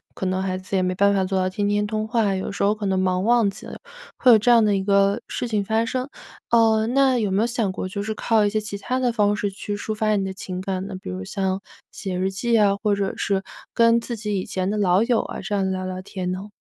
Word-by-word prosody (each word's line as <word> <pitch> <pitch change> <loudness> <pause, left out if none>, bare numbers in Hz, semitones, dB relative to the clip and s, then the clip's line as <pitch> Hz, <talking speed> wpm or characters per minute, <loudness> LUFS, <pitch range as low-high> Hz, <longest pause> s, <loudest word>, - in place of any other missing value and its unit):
可 - - -4
能 185 0 0
孩 185 -1 -2
子 185 +1 -5
也 190 - +2
没 185 0 -1
办 200 +2 +3
法 195 -1 +1
做 190 0 -1
到 185 0 +1
天 205 +2 -2
天 205 0 +1
通 215 0 -2
话， 220 -4 +1
有 190 +1 -3
时 200 - -3
候 205 +1 +3
可 210 -1 -5
能 190 -1 +1
忙 185 0 +1
忘 235 -1 +4
记 - - -12
了， - - -8 0.4
会 255 - +5
有 225 - +8
这 245 +4 +1
样 235 -2 +6
的 205 -1 +2
一 190 - -1
个 200 +2 +2
事 245 - -3
情 215 -3 0
发 220 +3 0
生。 255 +3 -3 0.4
呃， 225 -1 +4
那 265 0 +3
有 210 -3 0
没 190 +2 +1
有 235 - +1
想 230 -5 -1
过 185 - -4
就 200 +2 -4
是 215 +1 -3
靠 220 -1 +2
一 205 - +2
些 215 +1 0
其 210 -1 -5
它 255 +5 -2
的 250 -2 +1
方 210 -2 +2
式 205 -1 -2
去 205 +1 -5
抒 215 +1 -4
发 215 0 +1
你 195 -1 0
的 190 - -4
情 185 -1 -6
感 190 -1 -3
呢？ 195 - -6
比 - - -8
如 95 0 -5
像 190 - -2 0.3
写 190 -2 -5
日 190 +1 0
记 230 +4 +1
啊， 205 -2 +4
或 210 -2 +2
者 200 -1 -2
是 195 -1 -1 0.3
跟 230 0 +4
自 235 +1 -5
己 210 -2 -2
以 185 - -4
前 185 -1 -2
的 210 - -1
老 190 0 +3
友 235 -1 +2
啊 - - -7
这 195 +2 -5
样 200 -1 +1
子 - - 0
聊 185 0 -3
聊 185 0 -5
天 185 -1 -4
呢？ 190 +3 -5
205 Hz, 305 characters per minute, -23 LUFS, 190-220 Hz, 0.4 s, 有